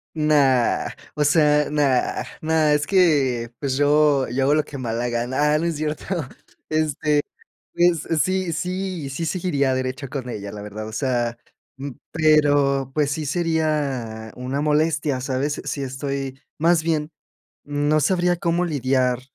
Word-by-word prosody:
No. 155 Hz, -1 st, +2 dB, 0.8 s
O 150 Hz, -, +1 dB
sea, 150 Hz, -1 st, +3 dB
nada, 140 Hz, -4 st, +1 dB, 0.2 s
nada. 155 Hz, -1 st, +3 dB
Es 150 Hz, 0 st, 0 dB
que, 140 Hz, -, +2 dB
pues, 135 Hz, -2 st, -2 dB
yo 145 Hz, -2 st, +3 dB
yo 125 Hz, +3 st, -1 dB
hago 140 Hz, +2 st, +4 dB
lo 155 Hz, -, +3 dB
que 140 Hz, -, -9 dB
me 130 Hz, -3 st, -5 dB
da -, -, -2 dB
la 120 Hz, +1 st, -1 dB
gana. 130 Hz, +5 st, +1 dB
Ah, -, -, +3 dB
no 160 Hz, -, -2 dB
es 170 Hz, -2 st, -1 dB
cierto. 150 Hz, 0 st, -3 dB, 0.6 s
Este, 155 Hz, -1 st, +1 dB, 0.5 s
pues, 175 Hz, -2 st, +2 dB, 0.2 s
sí, 185 Hz, -2 st, -1 dB
sí, 180 Hz, -5 st, -3 dB
sí, 165 Hz, +5 st, -3 dB
seguiría 155 Hz, -6 st, 0 dB
derecho 130 Hz, +2 st, -3 dB
con 130 Hz, -1 st, -5 dB
ella, 100 Hz, -3 st, -6 dB
la 105 Hz, 0 st, -8 dB
verdad. 105 Hz, +1 st, -7 dB
O -, -, -9 dB
sea, 120 Hz, -1 st, -1 dB, 0.7 s
pero, 145 Hz, -4 st, +3 dB
pues 150 Hz, -2 st, +1 dB
sí, 150 Hz, +1 st, -3 dB
sería 140 Hz, -9 st, -1 dB
una 130 Hz, +3 st, -3 dB
molestia, 150 Hz, -2 st, +1 dB
sabes, 135 Hz, +3 st, -2 dB
si 140 Hz, -, -3 dB
estoy 135 Hz, 0 st, -4 dB, 0.2 s
más 165 Hz, +1 st, +3 dB
bien, 155 Hz, -2 st, -1 dB, 0.5 s
no 145 Hz, +1 st, +1 dB
sabría 175 Hz, +2 st, +2 dB
cómo 170 Hz, +1 st, 0 dB
lidiar 130 Hz, -4 st, +1 dB
145 Hz, 150 wpm, -22 LUFS, 130-155 Hz, 0.8 s, hago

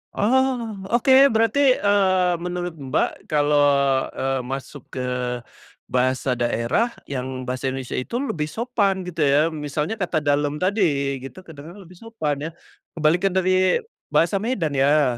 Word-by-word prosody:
Oh, 245 Hz, -1 st, +1 dB, 0.2 s
oke, 240 Hz, +2 st, +2 dB, 0.2 s
berarti, 230 Hz, +5 st, +4 dB
eee, 185 Hz, -4 st, +2 dB
menurut 175 Hz, -1 st, -4 dB
Mbak 135 Hz, -3 st, -2 dB
kalau, 150 Hz, -1 st, +2 dB, 0.6 s
eee, 135 Hz, 0 st, -1 dB
masuk 135 Hz, +1 st, -7 dB
ke 130 Hz, -, -3 dB, 0.9 s
bahasa 130 Hz, 0 st, 0 dB
daerah 120 Hz, -, 0 dB, 0.2 s
yang 130 Hz, -1 st, -4 dB
bahasa 130 Hz, +1 st, -3 dB
Indonesia 130 Hz, -1 st, -3 dB
itu 235 Hz, -, -3 dB
lebih 160 Hz, -, -2 dB
sopan 200 Hz, 0 st, -1 dB
gitu 165 Hz, -2 st, -4 dB
ya, 140 Hz, +1 st, +4 dB
misalnya 150 Hz, +5 st, -3 dB
kata 175 Hz, -5 st, -1 dB
"dalam" 145 Hz, 0 st, 0 dB
tadi 155 Hz, -9 st, +1 dB
gitu, 135 Hz, +8 st, -10 dB
kedengaran 165 Hz, +3 st, -12 dB
lebih 180 Hz, 0 st, -15 dB
sopan 155 Hz, -10 st, -3 dB
ya. -, -, -3 dB, 0.4 s
Kebalikan 175 Hz, +4 st, +1 dB
dari 185 Hz, -, +2 dB, 0.3 s
bahasa 175 Hz, +4 st, +3 dB
Medan 190 Hz, -, -2 dB
ya. 135 Hz, -3 st, +3 dB
165 Hz, 135 wpm, -22 LUFS, 140-200 Hz, 0.9 s, berarti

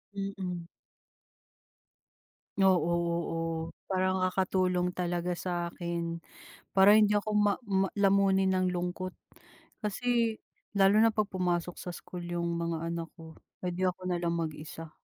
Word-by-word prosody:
Mm. 190 Hz, -3 st, -4 dB, 2.0 s
Oo-oo. 170 Hz, -2 st, +1 dB, 0.2 s
Parang 185 Hz, 0 st, +1 dB
nakakatulong 185 Hz, -1 st, +1 dB
talaga 175 Hz, 0 st, -1 dB
sa 180 Hz, +1 st, -4 dB, 0.2 s
akin. 170 Hz, -1 st, -3 dB, 0.5 s
Para 200 Hz, +2 st, +7 dB
hindi 210 Hz, -1 st, +5 dB
ako 210 Hz, +1 st, 0 dB
ma 205 Hz, -1 st, +4 dB
ma 195 Hz, -4 st, +1 dB
lamunin 195 Hz, -1 st, +3 dB
ng 185 Hz, -1 st, +1 dB
lungkot 180 Hz, +1 st, -3 dB, 0.7 s
kasi 230 Hz, +1 st, +1 dB, 0.4 s
lalo 200 Hz, +1 st, +5 dB
na 225 Hz, -1 st, +5 dB
'pag 210 Hz, -2 st, 0 dB
pumasok 175 Hz, -2 st, -1 dB
sa 180 Hz, -, -5 dB
school 175 Hz, 0 st, -8 dB
yung 170 Hz, -1 st, -2 dB
mga 165 Hz, -1 st, -2 dB
anak 170 Hz, -1 st, -3 dB
ko, 160 Hz, -1 st, -12 dB, 0.3 s
eh -, -, +1 dB
di 185 Hz, +2 st, 0 dB
ako 185 Hz, 0 st, -2 dB
na 175 Hz, -, +1 dB
lang 170 Hz, -1 st, 0 dB
mag-isa. 160 Hz, 0 st, -6 dB
180 Hz, 125 wpm, -30 LUFS, 170-195 Hz, 2.0 s, Para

